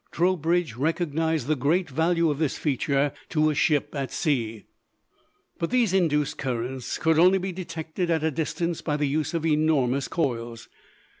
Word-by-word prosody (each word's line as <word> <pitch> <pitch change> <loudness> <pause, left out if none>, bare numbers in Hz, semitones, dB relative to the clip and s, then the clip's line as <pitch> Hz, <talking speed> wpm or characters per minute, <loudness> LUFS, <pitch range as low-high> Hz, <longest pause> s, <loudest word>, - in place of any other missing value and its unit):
Trowbridge 175 -4 +1
recognized 160 0 0
the 155 +2 +1
great 160 +7 +1
value 165 +3 +1
of 145 - -4
this 155 -4 0
feature 140 0 0 0.2
to 155 -1 +2
a - - -1
ship 150 -1 +1
at 135 -2 -3
sea. 115 -8 -1 1.0
But 165 - -1
these 240 -6 +2
induced 150 -6 +1
currents 125 0 -3
could 160 -1 +2
only 185 +3 +6
be 190 0 -3
detected 170 -1 -4
at 160 -2 +1
a 160 - +1
distance 165 +3 -2
by 150 -2 -1
the 150 - 0
use 150 +3 -1
of 165 -1 -1
enormous 150 -4 +2
coils. 115 -7 -3
155 Hz, 160 wpm, -25 LUFS, 140-170 Hz, 1.0 s, only